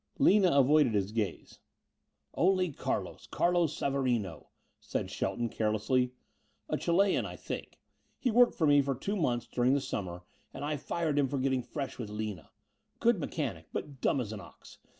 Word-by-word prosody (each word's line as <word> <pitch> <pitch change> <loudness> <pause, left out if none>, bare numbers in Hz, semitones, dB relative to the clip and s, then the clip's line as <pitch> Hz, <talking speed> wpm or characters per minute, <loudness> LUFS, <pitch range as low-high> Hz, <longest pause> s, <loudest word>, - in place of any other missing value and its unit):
Lina 195 -2 +5
avoided 140 -3 +4
his 100 0 0
gaze. 105 -6 -3 0.7
"Only 185 -1 +2
Carlos - - -3
Carlos 175 -3 +1
Savarino," 125 -10 -1 0.3
said - - -3
Shelton, 120 - -1
carelessly, 115 +4 +1 0.6
"a - - -1
Chilean, 190 +3 +2
I - - -7
think. - - -6 0.4
He 250 - 0
worked 245 +2 +5
for 160 - +1
me 145 -1 +6
for 135 -1 -1
two 195 +11 -3
months 125 - 0
during 125 +2 +2
the - - +2
summer 90 -9 -4 0.3
and 145 - -4
I 150 +1 -1
fired 150 +1 -1
him 140 - +3
for 140 - -2
getting 130 -1 +1
fresh 135 +2 -5
with 110 -4 -4
Lina. 105 -6 -5 0.5
Good 235 -4 +3
mechanic, 115 - -3
but 140 -4 -5
dumb - - +2
as 110 -4 -3
an 105 - -6
ox. - - -15
135 Hz, 165 wpm, -31 LUFS, 115-160 Hz, 0.7 s, me